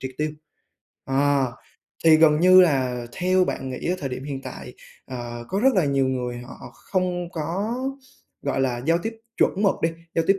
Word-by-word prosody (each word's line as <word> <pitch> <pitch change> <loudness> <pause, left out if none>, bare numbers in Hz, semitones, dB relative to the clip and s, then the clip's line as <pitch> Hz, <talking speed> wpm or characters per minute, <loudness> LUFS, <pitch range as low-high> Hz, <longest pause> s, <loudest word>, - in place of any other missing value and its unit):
triệt 130 - -5
tiêu. 155 0 0 0.7
Ờ, 135 -1 +1 0.5
thì 160 -1 +8
gần 155 -1 +5
như 185 +1 +8
là 130 -7 +2
theo 185 +1 +2
bạn 135 -7 -4
nghĩ 130 - -4
ở 180 - 0
thời 140 - -3
điểm 130 +1 -6
hiện 135 -2 -5
tại, - - -8 0.3
ờ, 120 -2 -6
có 195 +2 -1
rất 265 0 +4
là 185 -5 +3
nhiều 140 -1 +2
người 125 -2 -2
họ 125 0 -10
không 180 -2 -2
có, 180 +9 -2 0.7
gọi 140 -1 -1
là, 125 -2 -1
giao 165 +1 +3
tiếp 225 +5 -4 0.2
chuẩn 200 - +2
mực 195 - +4
đi, 165 - +4 0.3
giao 165 - +2
tiếp 195 0 +4
150 Hz, 190 wpm, -24 LUFS, 130-180 Hz, 0.7 s, thì